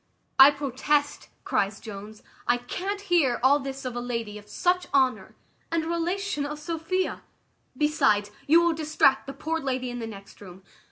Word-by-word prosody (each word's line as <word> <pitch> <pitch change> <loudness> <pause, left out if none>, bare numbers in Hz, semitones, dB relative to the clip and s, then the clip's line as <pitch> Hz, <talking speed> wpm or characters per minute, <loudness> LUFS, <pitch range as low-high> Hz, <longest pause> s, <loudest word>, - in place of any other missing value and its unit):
"I 270 +1 +11
protest," 290 +1 -1
cries 200 +1 0
Jones, 210 0 -10 0.2
"I 240 - +4
can't 380 +12 -4
hear 340 -11 +2
all 280 +3 +5
this 270 -1 -6
of 250 -1 -4
a - - -2
lady 230 -4 -4
of 210 0 -18
such 360 - 0
honour, 260 -2 +1 0.4
and 335 -1 +1
a - - -5
relation 340 -1 -1
of 295 +1 -4
Sophia; 330 +4 -2 0.6
besides, 215 -9 +2 0.2
you 330 +4 +6
will 340 -1 +3
distract 305 -4 +2
the 275 - -5
poor 320 +4 -2
lady 255 -3 -2
in 245 - -5
the 225 - -4
next 200 -2 -12
room. 190 -1 -12
275 Hz, 170 wpm, -26 LUFS, 240-325 Hz, 0.6 s, I